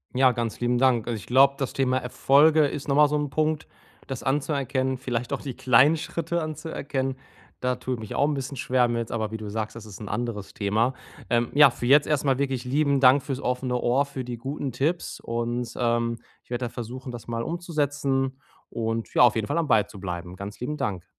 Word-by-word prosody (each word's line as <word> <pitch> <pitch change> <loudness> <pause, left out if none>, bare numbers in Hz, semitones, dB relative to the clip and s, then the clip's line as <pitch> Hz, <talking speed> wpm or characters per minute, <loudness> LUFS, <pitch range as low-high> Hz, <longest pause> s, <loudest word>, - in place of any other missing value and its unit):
Ja, 130 0 +5
ganz 120 -2 -3
lieben 120 0 +1
Dank. 125 -3 +3
Also, 115 -2 -1
ich - - -11
glaube, 135 +2 +6
das 135 - -2
Thema 130 -1 +1
Erfolge 145 +5 +4
ist 145 +1 -4
nochmal 145 +1 +5
so 150 - -1
‘n 145 -1 -1
Punkt, 155 +2 0 0.4
das 135 -3 -5
anzuerkennen, 135 -2 0
vielleicht 120 -2 -3
auch - - -2
die 135 -3 -5
kleinen 130 +7 +4
Schritte 170 +2 -3
anzuerkennen, 145 -4 -3 0.4
da 125 0 0
tue 130 +1 -4
ich 120 - -4
mich 110 - -7
auch 140 - +3
‘n 150 - 0
bisschen 135 0 -4
schwer 125 0 +2
mit. 115 -1 -2
Aber, 110 -2 -2
wie 110 - -3
du 105 -1 -7
sagst, 110 0 -4
das 115 -2 -9
ist 100 -3 -11
‘n 105 - -7
anderes 105 -2 -4
Thema. 110 +5 +1 0.4
Ähm, 120 0 +1
ja, 145 -1 +8
für 120 - -6
jetzt 140 +3 +5
erstmal 140 -3 +1
wirklich 135 -3 -1
lieben 140 +1 +2
Dank 130 +1 +6
für‘s 135 -1 -4
offene 125 -1 -1
Ohr, 125 +4 +2
für 140 -2 -6
die 120 -1 -6
guten 135 +2 -4
Tipps 150 +8 -2
und, 120 0 -3
ähm, 115 -1 0 0.3
ich - - -34
werde 125 0 -2
da 120 - -4
versuchen, 125 +2 -7
das 120 -2 -9
mal 115 0 -2
umzusetzen 145 -5 -1 0.3
und 115 0 -3
ja, - - +4
auf 120 -2 +6
jeden 110 -2 0
Fall - - -1
am 160 - 0
Ball 110 -5 +4
zu 100 - -12
bleiben. 90 -1 -5
Ganz 100 +2 -8
lieben 150 +5 -3
Dank. 95 -9 -2
130 Hz, 220 wpm, -25 LUFS, 115-140 Hz, 0.4 s, ja